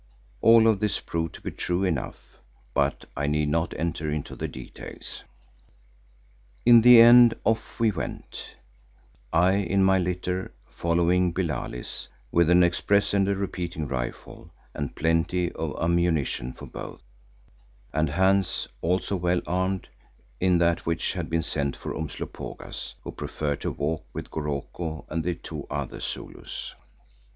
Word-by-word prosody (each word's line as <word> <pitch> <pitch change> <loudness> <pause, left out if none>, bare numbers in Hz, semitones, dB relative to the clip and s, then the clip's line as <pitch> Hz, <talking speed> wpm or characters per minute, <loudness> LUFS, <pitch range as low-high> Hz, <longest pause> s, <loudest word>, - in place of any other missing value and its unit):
All 115 0 +7
of 110 -3 +3
this 105 0 0
proved 80 -1 -3
to - - -11
be - - -4
true 90 +2 -1
enough, 80 -8 -3 0.3
but - - 0
I 70 +1 -1
need 75 0 +1
not 80 +2 0
enter 80 -1 -2
into 75 -1 -4
the - - -3
details. 65 -1 -9 1.4
In 120 -1 +9
the 120 0 +9
end 120 0 +9
off 115 0 -1
we 115 -2 +4
went, 90 - -6 0.8
I 90 +3 +4
in 95 0 +2
my 95 0 +4
litter 90 +1 -2
following 85 +1 +1
Billali's, 75 -9 -3 0.2
with 85 -1 +4
an 90 0 +6
express 100 +4 +2
and 100 -1 +3
a 100 - +2
repeating 90 -5 -3
rifle 65 -2 -5 0.2
and 70 -2 -4
plenty 85 +2 +1
of 80 -2 -4
ammunition 80 -7 +1
for - - -10
both, - - -9 0.9
and 80 +1 +1
Hans, 95 +3 +2
also 90 +3 0
well 90 -1 +1
armed, 95 +1 -1 0.5
in 90 -1 +3
that 85 0 +2
which 85 +1 -1
had 90 -4 -4
been 80 0 0
sent 70 -4 -1
for - - -6
Umslopogaas, 80 -2 -6
who - - -6
preferred 75 -2 -3
to - - -1
walk 75 +2 -2
with - - -7
Goroko 80 +2 -4
and 80 +1 -2
the 90 +1 -1
two - - -8
other - - -4
Zulus. - - -6
85 Hz, 145 wpm, -26 LUFS, 80-95 Hz, 1.4 s, In